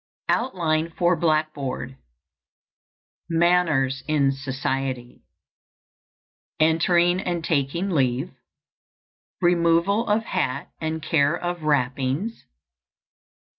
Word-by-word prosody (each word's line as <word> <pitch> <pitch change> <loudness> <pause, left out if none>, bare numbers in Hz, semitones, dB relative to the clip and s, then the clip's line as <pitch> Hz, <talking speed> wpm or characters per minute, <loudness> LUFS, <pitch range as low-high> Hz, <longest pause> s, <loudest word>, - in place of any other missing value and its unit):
OUTLINE 165 -9 0
FOR 175 0 +3
BLACKBOARD. 155 -5 -1 1.3
MANNERS 165 -6 +2
IN 145 -3 +2
SOCIETY. 135 -2 -4 1.4
Entering 170 +3 +3
and 175 -4 -3
taking 160 +6 -1
leave. 135 0 0 1.1
_Removal 175 +5 +3
of 215 +2 +2
hat 185 - -2
and 160 0 -3
care 155 -1 +2
of 175 -1 -4
wrappings. 140 - -1
160 Hz, 75 wpm, -24 LUFS, 135-175 Hz, 1.4 s, FOR